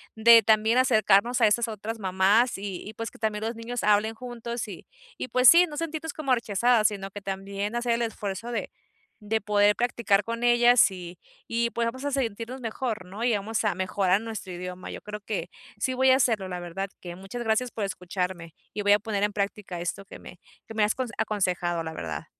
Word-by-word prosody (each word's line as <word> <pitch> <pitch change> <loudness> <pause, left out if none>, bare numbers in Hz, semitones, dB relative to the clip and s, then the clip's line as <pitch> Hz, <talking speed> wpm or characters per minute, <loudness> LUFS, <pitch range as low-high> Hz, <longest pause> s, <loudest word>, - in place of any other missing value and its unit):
de 230 +1 +8
también 220 +2 +3
acercarnos 235 -2 +3
a - - +7
esas 230 +3 +2
otras 220 +1 -5
mamás 195 +5 +2
y 195 -2 -5
y 215 - -8
pues 230 +1 -5
que - - -17
también 215 -1 -2
los 225 +1 -2
niños 230 +1 -5
hablen 210 +2 +3
juntos 235 0 -5
y 190 - -10 0.3
y, - - -4
pues 255 -1 +6
sí, 345 +1 +7
no 300 - -8
sentirnos 320 -1 -4
como 275 -4 0
rechazadas, 230 -1 +3
sino 195 -2 -5
que 205 - -8
también 195 +2 -4
hacer 240 0 +1
el 235 - -1
esfuerzo 220 0 -4
de - - -3 0.5
de 220 +1 -1
poder 205 0 +3
practicar 235 -4 +1
con 230 +2 -4
ellas 240 0 +6
y 175 -2 -9 0.3
y, 235 0 0
pues, 235 0 -1
vamos 260 +4 -4
a 285 - -1
sentirnos 245 0 -3
mejor, 225 -3 -3
¿no?, 200 +5 -7
y 245 - +3
vamos 215 +3 -2
a 205 -4 +1
mejorar 185 +2 +1
nuestro 220 -5 -6
idioma. 180 +1 -7
Yo - - -7
creo 210 0 -7
que 210 0 -4 0.3
sí 260 +5 -1
voy 260 +1 +4
a - - +6
hacerlo, 225 -7 +1
la 180 -1 -5
verdad 185 +3 -5
que 175 -1 -7
muchas 195 +6 -6
gracias 225 +2 0
por 220 - -4
escucharme, 180 -3 -4 0.2
y 210 - -3
voy 205 0 +5
a 205 - +4
poner 205 -1 -3
en 210 - 0
práctica 200 -3 -3
esto 175 +3 -4
que - - -11
me 180 - -13 0.3
que 225 - -10
me 215 - +2
has 210 - 0
conse 250 -3 -4
aconsejado, 180 -4 -1
la 160 0 -6
verdad. 80 - -5
215 Hz, 215 wpm, -26 LUFS, 195-235 Hz, 0.5 s, de